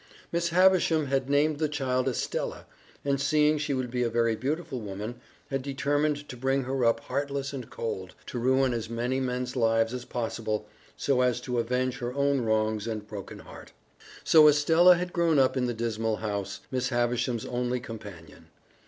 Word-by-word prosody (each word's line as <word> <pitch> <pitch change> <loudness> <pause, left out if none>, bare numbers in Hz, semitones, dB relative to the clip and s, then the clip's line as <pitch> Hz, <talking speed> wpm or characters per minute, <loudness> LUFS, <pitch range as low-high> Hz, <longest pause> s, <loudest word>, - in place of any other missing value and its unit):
Miss 170 0 0
Havisham 175 -3 +4
had 135 -1 -1
named 145 +1 +2
the 155 -1 +1
child 130 -3 -1
Estella, 130 - -3 0.4
and, 140 -1 +1
seeing 150 +1 +3
she 145 -1 -1
would 130 -2 -3
be 125 0 -1
a 120 - +1
very 115 0 +1
beautiful 135 +1 -3
woman, 105 +3 -6 0.3
had 135 -1 -1
determined 145 +2 -1
to - - -8
bring 135 +2 0
her 130 0 -1
up 115 -1 +3
heartless 140 0 -3
and 130 -4 -6
cold, 95 -5 -5
to 120 - -5
ruin 130 +1 +2
as 115 -1 -3
many 120 +3 -1
men's 125 -1 -2
lives 115 -1 +2
as 125 -1 -4
possible, 110 -2 -3 0.3
so 135 -3 +1
as 125 -1 +2
to 125 -2 -2
avenge 125 +2 -1
her 125 +1 -4
own 140 -1 +2
wrongs 110 -1 0
and 110 -2 -4
broken 100 -2 -8
heart. - - -13 0.5
So 155 -2 +7
Estella 165 +5 +6
had 180 0 -4
grown 170 -3 +2
up 130 -1 +4
in 125 -1 +1
the - - -1
dismal 115 -1 -1
house, 105 -3 -4
Miss 130 -1 -1
Havisham's 120 -1 0
only 125 0 -1
companion. 105 -8 -10
125 Hz, 180 wpm, -28 LUFS, 115-140 Hz, 0.5 s, So